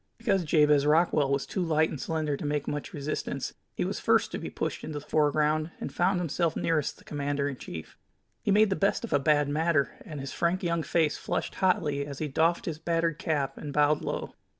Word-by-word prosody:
Because 200 -5 +1
Jabez 150 -2 +4
Rockwell 150 -2 +3
was 140 0 +1
too 190 - -3
light 160 -2 +2
and 145 - -5
slender 155 -3 -1
to - - -7
make 145 -1 -1
much 145 0 -3
resistance, 150 +1 -3 0.2
he - - -1
was - - -3
first - - +2
to - - -3
be - - -5
pushed - - -3
into 155 -1 -5
the 145 - -8
foreground, 155 +1 +2
and - - -5
found 180 +1 +2
himself 165 -1 0
nearest 160 -3 0
the - - -18
commander 145 -1 -2
in 140 - -3
chief. 80 -9 -9 0.4
He - - -2
made 205 0 +5
the - - +2
best 200 +4 +1
of 235 - -3
a 145 - +4
bad 145 0 +3
matter, 150 0 +1
and 150 -3 -7
his 135 0 -5
frank 175 +2 0
young 170 -1 +1
face 160 -1 +1
flushed - - -3
hotly 155 -7 +1
as 140 -2 -7
he 155 - -2
doffed 165 +5 +1
his 160 -2 -4
battered 165 0 0
cap 145 -6 -1
and 145 - -5
bowed 150 +1 +3
low. - - -4
155 Hz, 220 wpm, -28 LUFS, 145-170 Hz, 0.4 s, made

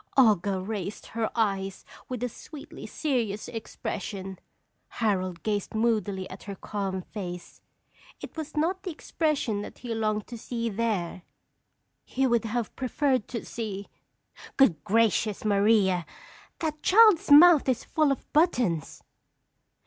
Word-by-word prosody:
"Olga 205 -6 +4
raised 200 0 -5
her 225 -1 0
eyes 195 -4 -1 0.2
with 250 -2 -4
a - - +1
sweetly 285 +5 -10
serious 235 -9 -2
expression. 195 -4 -5 0.5
Harold 185 -6 -1
gazed 210 -1 -2
moodily 215 -4 0
at 185 - -10
her 200 -1 -6
calm 195 -2 -4
face. 180 -4 -8 0.6
It - - -9
was 315 -1 -6
not 355 +5 +1
the 380 - -5
expression 300 - -1
that - - -9
he 240 -2 -5
longed 215 -1 -1
to 235 -2 -9
see 235 0 -3
there. 200 -5 -2 0.8
He 265 +1 -1
would 235 -3 +2
have 230 0 -3
preferred 260 -1 0
to 235 - -5
see 205 -4 -5 0.3
" - - -18
Good 170 - +4
gracious, 215 0 +1
Maria! 200 -4 +3 0.5
That 305 -2 -3
child's 420 -5 +6
mouth 300 -1 +8
is 250 -2 0
full 305 -3 +2
of 275 - -5
buttons! 245 - +1
220 Hz, 135 wpm, -27 LUFS, 195-265 Hz, 0.8 s, mouth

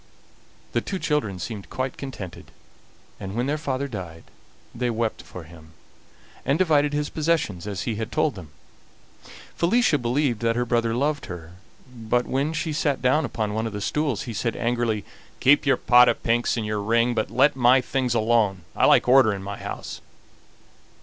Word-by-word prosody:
The - - 0
two 195 - -4
children 150 - -1
seemed 100 +1 -6
quite 130 0 -3
contented, 105 -10 -8 0.7
and 95 +1 -6
when 120 +2 0
their 150 +3 -1
father 140 -2 -2
died 90 -9 -7 0.5
they 125 +1 -1
wept 115 -1 -2
for 90 - -10
him, 80 0 -15 0.7
and 140 - +1
divided 150 -5 +3
his 145 0 -2
possessions 150 - -1
as 100 -2 -4
he 110 -3 -3
had 110 +1 -4
told 145 +6 +1
them. 90 -6 -10 1.1
Felicia 175 -3 +2
believed 120 0 0
that 115 0 +1
her 120 0 0
brother 115 -1 0
loved 145 +3 -1
her, 85 -2 -8 0.4
but 120 0 -1
when 140 +4 -1
she 160 0 -2
sat 145 -2 0
down 130 +5 +2
upon 110 -4 -3
one 110 +1 -1
of 110 - -7
the 105 - -4
stools 140 +1 -1
he 120 - -6
said 115 +2 -2
angrily: 115 -3 -1 0.3
"Keep 140 +2 +4
your 135 -2 +4
pot 125 +2 +6
of - - -2
pinks 120 +1 +1
and 110 - -2
your 105 -1 -2
ring, 115 +3 +2
but 110 -2 -1
let 145 - +3
my 130 0 +5
things 125 -1 -1
alone. 110 -5 +2
I - - +4
like - - +5
order 130 -3 +6
in 100 -1 -5
my 100 0 -6
house." - - -7
120 Hz, 180 wpm, -24 LUFS, 105-140 Hz, 1.1 s, pot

